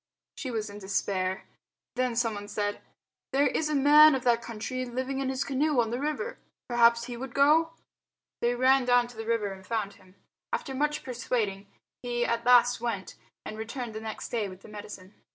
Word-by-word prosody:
She 265 - -5
was 220 -3 -2
in 205 0 -9
despair. 190 -1 -1 0.5
Then 250 -1 0
someone 220 -4 -1
said, 205 0 -2 0.5
"There 280 +2 +4
is 305 +1 0
a 305 - 0
man 295 +2 +7
of 260 - -3
that 235 -2 +3
country 235 +3 -4
living 260 +2 -3
in 270 -1 -1
his 265 +1 -1
canoe 280 0 +1
on 230 -1 +1
the 240 - -2
river. 305 - -3 0.3
Perhaps 235 -1 +4
he 240 0 -6
would 250 +1 -7
go?" 310 +4 +4 0.7
They 240 +1 +2
ran 260 +1 +4
down 245 -1 +4
to 245 - -14
the 225 0 -6
river 225 -3 0
and 190 0 -12
found 205 -1 -2
him. 185 0 -21 0.4
After 270 - -3
much 295 +3 -1
persuading 230 -5 -2 0.3
he 240 -1 -1
at 235 +1 -1
last 245 -1 +5
went, 225 -5 -3 0.3
and 215 - -7
returned 230 +1 -5
next 220 0 -6
day 220 -4 -1
with 185 0 -12
the - - -13
medicine. 205 -2 -10
240 Hz, 190 wpm, -28 LUFS, 215-265 Hz, 0.7 s, man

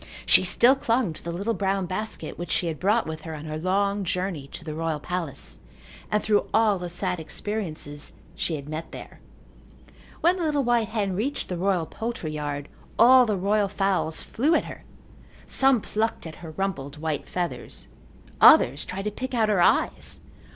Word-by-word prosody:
She - - +6
still 235 +8 +5
clung 230 -8 0
to - - -10
the 170 - -4
little 200 +7 -1
brown 195 -2 0
basket 215 +5 -4
which 175 - -6
she - - +1
had 160 -3 -3
brought 210 +5 +2
with 155 0 -6
her 160 0 -6
on 150 +1 -8
her 155 0 -4
long 200 +3 +1
journey 180 -5 -2
to 165 - -10
the 155 -1 -5
royal 160 -1 -2
palace 170 -3 -4 0.5
and 210 0 +1
through 210 -1 +2
all 215 -3 +4
the 180 0 -5
sad 180 0 -2
experiences 160 -5 -5 0.2
she 165 - -2
had 140 -1 -7
met 155 +2 -6
there. - - -10 1.0
When 350 +3 +4
the 355 - -2
little 295 -3 +1
white 240 -2 +2
hen 205 -4 -1
reached 270 +8 -2
the 180 - -2
royal 180 -2 +1
poultry 225 -5 -4
yard 145 -1 -4 0.3
all 250 +2 +7
the 210 -2 0
royal 200 +2 +2
fowls 195 -5 0
flew 300 +8 +1
at - - +1
her. - - -9 0.6
Some 270 -4 +3
plucked 220 -1 -2
at 160 - -8
her 165 - -9
rumpled 155 -5 -3
white 155 -2 -3
feathers. 175 -1 -5 0.5
Others 140 +4 +7
tried 190 +1 -5
to 210 - -1
pick 260 +4 -5
out 220 -2 +2
her 200 -4 +3
eyes. - - +2
190 Hz, 185 wpm, -25 LUFS, 160-220 Hz, 1.0 s, all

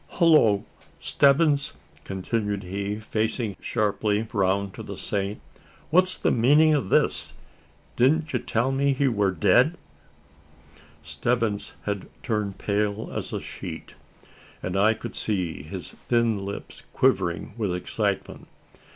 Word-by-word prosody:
Hullo, 150 - +4 0.3
Stebbins!" 140 0 +3 0.3
continued 100 +1 -2
he, 100 +3 -3
facing 110 0 -2
sharply 105 0 0
round 100 -1 +1
to - - -8
the - - -7
Saint; 100 +1 -2 0.5
"what's 185 +2 +4
the - - +1
meanin' 150 +7 +5
o' 145 - +3
this? 95 - +1 0.6
Didn't 155 +5 +2
you 125 - +1
tell 120 +4 0
me 140 +1 +2
that - - -8
he 140 - +3
wur 105 -5 +2
dead?" 125 - +3 1.3
Stebbins 115 -4 -1
had 100 -2 -4
turned 105 -5 -2
pale 105 +1 -1
as - - -3
a - - -2
sheet; - - -8 0.7
and 90 - -3
I 105 +3 +4
could 120 - -7
see 90 -8 -2
his 80 +1 -8 0.2
thin 115 -4 +2
lips 100 +1 -7
quivering 90 -10 +1
with 105 -6 -1
excitement. 90 - -3
110 Hz, 125 wpm, -25 LUFS, 100-130 Hz, 1.3 s, meanin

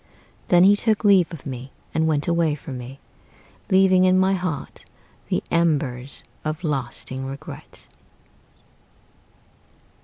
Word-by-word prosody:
Then 175 0 +5
he 200 +2 +7
took 215 0 +1
leave 195 -5 +5
of 165 -5 -9
me, 130 -1 -7 0.2
and 160 0 +1
went 150 -2 0
away 170 -3 +2
from 135 -3 -8
me, 125 +2 -9 0.7
Leaving 190 -1 +5
in 185 0 +4
my 190 +1 +3
heart 180 -6 -4 0.5
the - - 0
embers 145 -6 0 0.2
of 155 +3 -4
lasting 130 -3 -3
regret. 135 +1 -9
160 Hz, 120 wpm, -23 LUFS, 135-185 Hz, 0.7 s, he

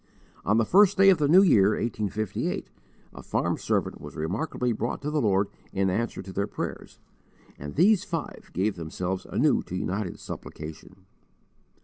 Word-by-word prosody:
On 105 +3 +2
the 115 - +3
first 200 - +5
day 195 0 +7
of 180 - +2
the 145 - +2
new 180 +6 +7
year, 105 - +5
1858, 110 -3 -2 0.5
a - - -9
farm - - -1
servant - - -2
was - - -9
remarkably 110 - -2
brought 115 +1 -2
to 150 - -2
the 150 -1 +1
Lord 100 -2 +2 0.3
in 95 -1 +1
answer 115 +3 -2
to 95 0 -9
their 100 +2 -1
prayers, - - -6 0.6
and 75 +1 -7
these 195 +5 +4
five 165 -3 -5
gave 95 +2 -1
themselves 90 +3 -4
anew - - +2
to 90 - -7
united 90 0 -3
supplication. 75 0 -9
105 Hz, 160 wpm, -26 LUFS, 95-150 Hz, 0.6 s, day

